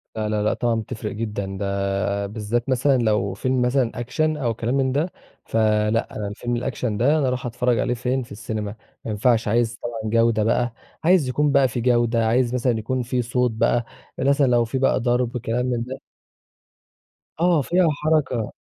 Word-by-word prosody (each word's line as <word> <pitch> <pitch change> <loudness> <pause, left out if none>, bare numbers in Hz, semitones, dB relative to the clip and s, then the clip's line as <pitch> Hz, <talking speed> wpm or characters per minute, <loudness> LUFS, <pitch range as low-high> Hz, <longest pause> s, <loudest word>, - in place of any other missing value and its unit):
لا، 110 -1 -2
لا، 105 -1 0
لأ، 110 - +2
طبعًا 120 -1 0
بتفرِق 110 -1 -4
جدًا، 105 -3 -4
ده 100 0 -1
بالذات 110 +4 -2
مثلًا 130 +1 +3
لو 105 -4 +1
فيلم 130 +5 0
مثلًا 125 -1 +2
Action 125 - -12 0.2
أو 120 -5 -1
كلام 115 +3 -2
من 130 -1 +1
ده، 155 +6 0 0.3
فلأ 110 0 +1
أنا 105 -1 -3
الفيلم 120 +3 -3
الAction 130 - -9 0.2
ده 145 +6 +4
أنا 140 -4 +1
اروح 125 0 -2
أتفرّج 125 -1 0
عليه 125 - +1
فين، 125 +2 -1
في 115 - -16
السينما، 105 -1 -5 0.3
ما 110 - -3
ينفعش 115 +1 +2
عايز 115 +2 +1
طبعًا 110 -2 -4
جودة 115 -2 +3
بقى، 120 +1 +1 0.3
عايز 170 -6 +4
يكون 145 +2 +1
بقى 140 -2 +4
في 120 0 -3
جودة، 120 -2 +2
عايز 120 +1 +2
مثلًا 125 -2 +1
يكون 130 +4 -2
في 125 +1 -1
صوت 125 0 0
بقى 115 +1 +1 0.3
مثلًا 140 0 +3
لو 120 -1 +3
في 125 +4 -3
بقى 135 0 +2
ضرب 120 0 0
كلام 120 +1 -1
من 120 -2 -1
ده 130 +2 -7 1.4
آه 170 -3 +3
فيها 175 +4 +2 0.2
حَرَكة. 135 -8 +1
120 Hz, 185 wpm, -23 LUFS, 110-130 Hz, 1.4 s, ده